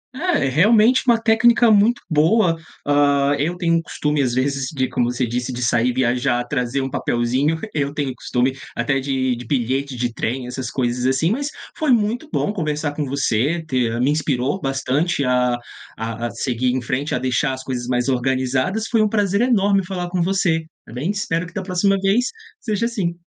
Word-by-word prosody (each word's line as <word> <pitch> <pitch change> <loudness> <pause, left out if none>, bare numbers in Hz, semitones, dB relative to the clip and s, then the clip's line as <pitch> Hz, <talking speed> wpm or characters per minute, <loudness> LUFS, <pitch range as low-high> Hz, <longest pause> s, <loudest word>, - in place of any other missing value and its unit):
Eh, 345 - 0
é 135 - +1
realmente 215 - +4
uma 235 -2 +5
técnica 230 +1 +4
muito 215 +3 +4
boa. 165 +4 +3 0.3
Hã, 145 -1 +3
eu 155 +5 0
um - - -11
tenho 165 -2 +1
costume, 150 -2 -1
às 125 -3 0
vezes, 135 +1 0
de 130 -4 -1
como 120 0 0
você 125 +1 -1
disse, 125 +2 -3
de 125 0 -4
sair, 120 +1 +2
viajar, 125 0 +1
trazer 125 0 -1
um 135 - -3
papelzinho, 130 +7 0
eu 140 -2 -1
tenho 140 -3 -2
costume 125 +1 -1 0.2
até 135 +3 0
de 130 -2 -1
de 120 +1 -9
bilhete 135 +2 -1
de 120 -1 -2
trem, 125 +3 -3
essas 125 0 -5
coisas 125 -1 -1
assim, 135 +7 +2
mas 280 +6 -1 0.3
foi 310 - -1
muito 235 +5 +1
bom 205 - 0
conversar 150 -5 -2
com 150 0 -2
você, 140 +4 0
ter 120 -4 0
me 135 +4 +2
inspirou 145 +1 0
bastante 135 +4 0
a 125 -1 +2 0.4
a 115 +1 -3
a - - -6
seguir 125 -1 -2
em 130 +1 -1
frente, 130 +5 -2
a - - -1
deixar 130 +2 0
as 130 0 -7
coisas 125 -2 -4
mais 125 0 0
organizadas. 130 - 0
Foi 225 -2 +2
um 215 - +2
prazer 205 -1 +1
enorme 200 -5 +3
falar 180 -2 -4
com 180 - 0
você, 170 -3 +1 0.2
tá - - -13
bem. 135 +9 -3
Espero 180 -4 -1
que, - - -15
da 200 - -3
próxima 195 +2 +1
vez, 195 +6 +2 0.4
seja 220 -1 -1
assim. 195 -8 -2
140 Hz, 195 wpm, -20 LUFS, 125-190 Hz, 0.4 s, uma